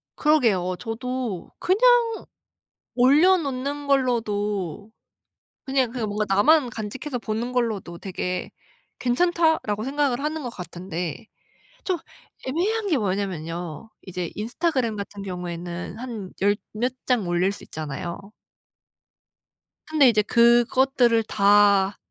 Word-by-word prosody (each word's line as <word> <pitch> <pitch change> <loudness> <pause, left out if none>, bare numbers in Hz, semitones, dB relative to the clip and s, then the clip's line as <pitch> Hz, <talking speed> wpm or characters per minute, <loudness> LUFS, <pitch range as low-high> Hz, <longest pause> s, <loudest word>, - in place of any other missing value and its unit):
그러게요. 225 - +2
저도 230 -1 -4
그냥 460 +3 +3 0.7
올려놓는 285 0 +3
걸로도 210 - 0 0.7
'그냥 265 -3 +1
그냥 235 -3 -3
뭔가 210 +1 -1
나만 260 +6 +4
간직해서 240 +5 -5
보는 230 +2 -3
걸로도 215 -8 -2
되게 180 -1 -4 0.5
괜찮다.'라고 315 -5 +1
생각을 275 -1 0
하는 305 +2 -2
것 245 - -4
같은데 175 -3 -6 0.6
좀 370 -2 0 0.5
애매한 400 +11 0
게 315 -7 +2
뭐냐면요. 180 -3 -3
이제 180 -3 -5
인스타그램 240 +1 -1
같은 200 0 -6
경우에는 180 -1 -6
한 230 -6 -6
열 205 +1 +4 0.2
몇 240 +4 -1
장 245 -7 +1
올릴 175 +2 +1
수 - - -10
있잖아요. 155 +3 -5 1.7
근데 305 -4 +5
이제 215 -3 +4
그것들을 240 +1 +4
다 200 -1 +4
225 Hz, 245 characters per minute, -24 LUFS, 195-270 Hz, 1.7 s, 근데